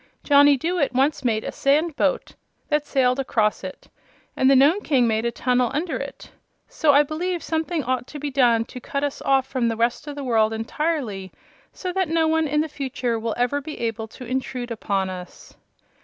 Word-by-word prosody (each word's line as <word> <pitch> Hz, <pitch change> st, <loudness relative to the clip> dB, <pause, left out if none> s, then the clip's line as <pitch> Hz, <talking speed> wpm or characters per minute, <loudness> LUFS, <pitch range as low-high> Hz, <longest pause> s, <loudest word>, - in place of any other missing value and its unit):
"Johnny 285 Hz, -1 st, +6 dB
Dooit 325 Hz, -1 st, 0 dB
once 270 Hz, +4 st, +1 dB
made 220 Hz, -3 st, 0 dB
a -, -, -4 dB
sand 300 Hz, +3 st, +1 dB
boat -, -, 0 dB, 0.4 s
that 300 Hz, -1 st, 0 dB
sailed 255 Hz, -1 st, +2 dB
across 220 Hz, -6 st, 0 dB
it, 185 Hz, -, -8 dB, 0.5 s
and 260 Hz, -, +3 dB
the 275 Hz, -, +6 dB
Nome 295 Hz, +10 st, +5 dB
King 265 Hz, -9 st, +2 dB
made 220 Hz, 0 st, 0 dB
a 235 Hz, -, +1 dB
tunnel 250 Hz, 0 st, +1 dB
under 325 Hz, +3 st, -1 dB
it. -, -, -7 dB, 0.4 s
So 310 Hz, -3 st, +2 dB
I 285 Hz, +1 st, +6 dB
believe 340 Hz, +4 st, -3 dB
something 320 Hz, 0 st, -1 dB
ought 255 Hz, 0 st, -2 dB
to 300 Hz, -, -8 dB
be 290 Hz, 0 st, -4 dB
done 240 Hz, -4 st, +3 dB
to 250 Hz, -, -9 dB
cut 280 Hz, +2 st, -3 dB
us 285 Hz, -1 st, -3 dB
off 270 Hz, -1 st, +2 dB
from 255 Hz, -3 st, -1 dB
the 225 Hz, -1 st, -1 dB
rest 235 Hz, +5 st, 0 dB
of 290 Hz, -, -5 dB
the 285 Hz, -, -5 dB
world 225 Hz, -3 st, +2 dB
entirely, 225 Hz, -, -3 dB, 0.4 s
so 365 Hz, -1 st, -5 dB
that 375 Hz, -3 st, 0 dB
no 325 Hz, 0 st, +2 dB
one 320 Hz, 0 st, +2 dB
in 300 Hz, +1 st, +1 dB
the 315 Hz, -, -2 dB
future 255 Hz, -5 st, -3 dB
will 225 Hz, 0 st, -3 dB
ever 250 Hz, +4 st, 0 dB
be 305 Hz, +2 st, -7 dB
able 225 Hz, -1 st, -3 dB
to 250 Hz, +3 st, -11 dB
intrude 250 Hz, -1 st, -3 dB
upon 195 Hz, -4 st, -1 dB
us." 180 Hz, -1 st, -10 dB
270 Hz, 200 wpm, -23 LUFS, 235-300 Hz, 0.5 s, Johnny